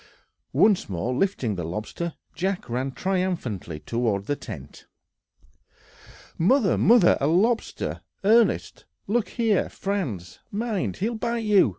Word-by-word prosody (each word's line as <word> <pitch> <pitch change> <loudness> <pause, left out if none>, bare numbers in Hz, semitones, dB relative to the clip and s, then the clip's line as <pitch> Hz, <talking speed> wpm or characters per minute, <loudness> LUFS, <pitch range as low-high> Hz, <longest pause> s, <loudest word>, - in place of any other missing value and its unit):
Once 205 - +3
more 95 +7 -2
lifting 130 - 0
the 90 -3 -4
lobster, 105 - -4 0.2
Jack 190 +4 -2
ran 130 +3 -2
triumphantly 170 - -2
toward 110 -1 -1
the 145 - 0
tent. 70 - -10 1.5
"Mother, 215 +4 +4
mother! 225 -4 +5
a 140 - +2
lobster, 215 +9 +1 0.2
Ernest! 225 +3 +3 0.2
look 220 +2 0
here, 225 -5 +1
Franz! 140 - -4
mind, 215 -2 -2
he'll 220 +5 -1
bite 235 +1 -2
you! 205 - +5
180 Hz, 115 wpm, -25 LUFS, -, 1.5 s, mother